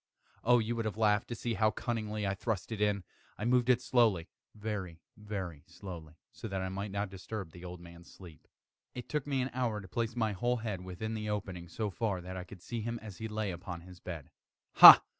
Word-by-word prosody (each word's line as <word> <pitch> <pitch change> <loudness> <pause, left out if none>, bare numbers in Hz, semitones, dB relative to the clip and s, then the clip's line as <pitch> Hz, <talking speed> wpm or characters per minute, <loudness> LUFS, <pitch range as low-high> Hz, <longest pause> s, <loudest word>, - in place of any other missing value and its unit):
Oh, 120 +1 +6
you 115 0 0
would 115 -1 -2
have 110 -1 -2
laughed 105 +1 +3
to 120 - -4
see 115 +1 -2
how 110 +1 +3
cunningly 110 -3 -2
I 95 - +1
thrust 105 +1 -3
it 110 -2 -3
in! 105 -2 +2 0.3
I 105 - -3
moved 125 0 +3
it 125 0 +4
slowly 110 -10 +3 0.3
very, 105 -6 -4 0.2
very 95 -8 -5
slowly, 85 -5 -9 0.2
so 115 - -7
that 95 -2 -2
I 95 0 -2
might 100 +2 -3
not 100 0 -2
disturb 95 -1 -6
the 90 +1 -12
old 90 0 -7
man's 85 0 -13
sleep. 85 -5 -14 0.5
It 125 - -6
took 150 -2 -2
me 135 -3 +1
an 130 - -3
hour 120 -4 0
to 100 - -9
place 115 +5 -2
my 110 -3 +1
whole 120 +6 0
head 110 -5 -3
within 95 +5 -4
the 105 -1 -3
opening 95 -4 -3
so 105 +4 -3
far 95 0 -1
that 90 +1 -7
I 90 -1 -5
could 95 -1 -12
see 120 -1 -4
him 115 +2 -2
as 105 -4 -10
he 110 - -3
lay 105 -2 -2
upon 90 -1 -6
his 90 0 -13
bed. 85 -6 -7 0.5
Ha! - - +14
105 Hz, 225 wpm, -32 LUFS, 90-115 Hz, 0.5 s, Ha